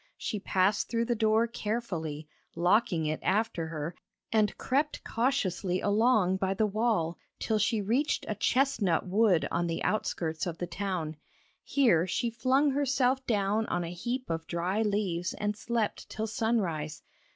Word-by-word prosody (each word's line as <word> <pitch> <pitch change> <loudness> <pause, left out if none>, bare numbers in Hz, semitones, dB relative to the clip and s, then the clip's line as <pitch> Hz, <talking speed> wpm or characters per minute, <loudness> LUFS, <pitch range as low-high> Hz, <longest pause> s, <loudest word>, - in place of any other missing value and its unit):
She 210 - -3
passed 195 +1 +1
through 230 0 0
the 240 - +1
door 220 0 +3
carefully, 200 -10 -4 0.3
locking 175 -1 +2
it 155 0 -1
after 190 -4 0
her, 160 +1 -4 0.4
and 215 -2 +2
crept 290 +3 0
cautiously 200 -7 0
along 205 -3 +3
by 190 0 0
the 215 - +2
wall 210 -6 0 0.2
till 220 -1 0
she 215 0 +1
reached 250 +9 0
a - - -1
chestnut 215 - +1
wood 190 -2 +3
on 175 0 0
the 165 - -2
outskirts 165 -6 -1
of 170 -1 -4
the 175 - -3
town. 175 -4 -3 0.5
Here 190 - +3
she 235 +6 -1
flung 260 +5 +2
herself 270 -1 +1
down 210 0 +1
on 175 - -1
a 170 +1 -5
heap 245 +8 -3
of 165 0 -3
dry 180 +5 -1
leaves 195 -5 -1
and 210 0 -2
slept 225 0 -2
till 220 - -3
sunrise. 195 -9 -1
210 Hz, 150 wpm, -29 LUFS, 175-230 Hz, 0.5 s, door